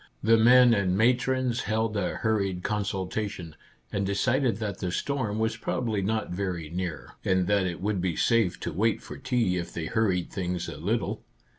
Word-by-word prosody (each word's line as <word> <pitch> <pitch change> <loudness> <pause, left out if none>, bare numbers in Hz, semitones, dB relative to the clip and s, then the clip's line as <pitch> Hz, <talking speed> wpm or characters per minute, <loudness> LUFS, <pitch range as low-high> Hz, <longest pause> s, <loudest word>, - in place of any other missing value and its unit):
The 115 +1 +5
men 120 +2 +7
and 95 -3 +1
matrons 125 +1 +2
held 110 +1 0
a 100 -3 -1
hurried 100 -5 -1
consultation, 100 -4 -3 0.4
and 100 - -1
de 100 +1 -1
cided 125 +3 +1
that 105 -4 -4
the 90 - -2
storm 115 -1 -2
was 110 0 0
probably 115 -3 -1
not 110 +1 -1
very 90 -4 -3
near, 90 -1 -4
and 95 -1 +2
that 100 -1 +2
it 85 -1 -5
would 100 -2 0
be 90 -3 -1
safe 115 -6 +2
to - - -3
wait 110 +6 +1
for - - -9
tea 120 -8 +1
if 85 - -4
they 80 - -4
hurried 95 -2 0
things 90 -2 -3
a - - -7
little. - - -1
100 Hz, 180 wpm, -27 LUFS, 90-115 Hz, 0.4 s, men